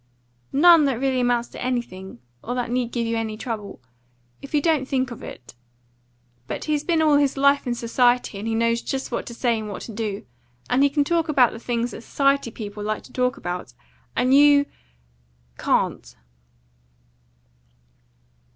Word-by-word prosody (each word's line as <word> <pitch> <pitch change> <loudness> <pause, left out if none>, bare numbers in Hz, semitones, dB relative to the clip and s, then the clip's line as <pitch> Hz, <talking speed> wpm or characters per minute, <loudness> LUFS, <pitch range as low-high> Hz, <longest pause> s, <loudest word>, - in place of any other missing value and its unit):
"None 330 +1 +6
that 265 -4 0
really 265 -1 +1
amounts 245 -1 +1
to - - -10
anything, 190 - -4 0.2
or 245 - -3
that 245 -2 -2
need 245 -1 -1
give 235 -2 -1
you 230 0 -1
any 220 -1 -3
trouble, 215 -4 -6 0.6
if 275 - -10
you - - +5
don't 300 -4 +1
think 260 -2 -1
of 235 - -8
it. 120 - -10 0.9
But - - -4
he's 300 -1 -1
been 325 -1 +2
all 300 -2 +5
his 285 -1 +1
life 280 0 +3
in 240 - 0
society, 240 -2 +1
and 215 - -5
he 225 - 0
knows 230 +1 +1
just 270 0 -4
what - - -3
to 235 - -7
say 235 -2 +1
and 215 -1 -6
what 200 - -6
to - - -8
do, 210 -4 -4 0.5
and 250 +2 +3
he 285 - +5
can 290 +1 +1
talk 330 +1 0
about 260 -5 +4
the 225 - -8
things 235 0 -2
that - - -8
society 275 0 +1
people 210 -2 -7
like 215 0 -3
to - - -16
talk 250 +1 0
about, 175 - -6 0.4
and 255 +2 +2
you 285 0 +6 0.9
can't." - - 0
245 Hz, 180 wpm, -23 LUFS, 225-275 Hz, 0.9 s, None